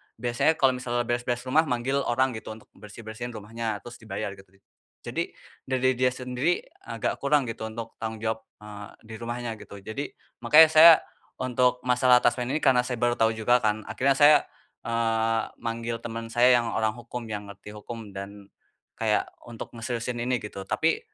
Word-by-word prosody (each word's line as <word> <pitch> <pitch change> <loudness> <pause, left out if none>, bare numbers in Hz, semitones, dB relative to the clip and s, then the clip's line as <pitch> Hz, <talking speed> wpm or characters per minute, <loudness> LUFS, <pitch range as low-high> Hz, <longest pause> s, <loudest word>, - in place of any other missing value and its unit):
biasanya, 120 +7 +1
kalau 135 -3 +4
misalnya 120 -1 -1
beres-beres 120 +1 -2
rumah 150 +5 +2
manggil 130 +2 0
orang, 130 +2 +2
gitu, 110 - -7
untuk 110 - -18
bersih-bersih 110 +2 -9
rumahnya 110 0 -4
terus 120 0 -11
dibayar, 100 -2 -5
gitu. 95 - -16 0.6
Jadi, - - -3 0.3
dari 130 0 +2
dia 125 0 +3
sendiri 125 +6 -1 0.2
agak 115 -2 -2
kurang, 140 0 +2
gitu, 110 - -6
untuk 115 +1 -8
tanggung 110 -1 -5
jawab, 110 0 -1 0.2
eee, 105 -1 -9 0.2
dirumahnya, 115 +1 -5
gitu. - - -11
Jadi, 110 +8 -6 0.3
makanya 160 +1 +8
saya 160 +1 +10 0.5
untuk 125 0 +1
masalah 125 0 +4
taspen 125 -1 +1
ini, 145 +5 -1
karena 125 -1 +4
saya 125 - -2
baru 120 0 +2
tahu 110 0 +3
juga 120 +3 +3
kan, 110 -1 0
akhirnya 135 +1 +2
saya, 145 +2 +7 0.5
eee, 115 -1 +1 0.2
manggil 115 0 -3
teman 115 0 -6
saya 125 +1 +5
yang 115 - -3
orang 110 -1 0
hukum, 120 0 -7
yang 105 -2 -6
ngerti 105 +1 -12
hukum, 105 -1 -9
dan 100 +1 -8 0.5
kayak, - - 0 0.2
untuk 115 -2 -8
ngeseriusin 120 +1 -4
ini, 125 +1 0
gitu. 100 -2 -7
Tapi, 165 +1 +1
120 Hz, 165 wpm, -26 LUFS, 110-125 Hz, 0.6 s, saya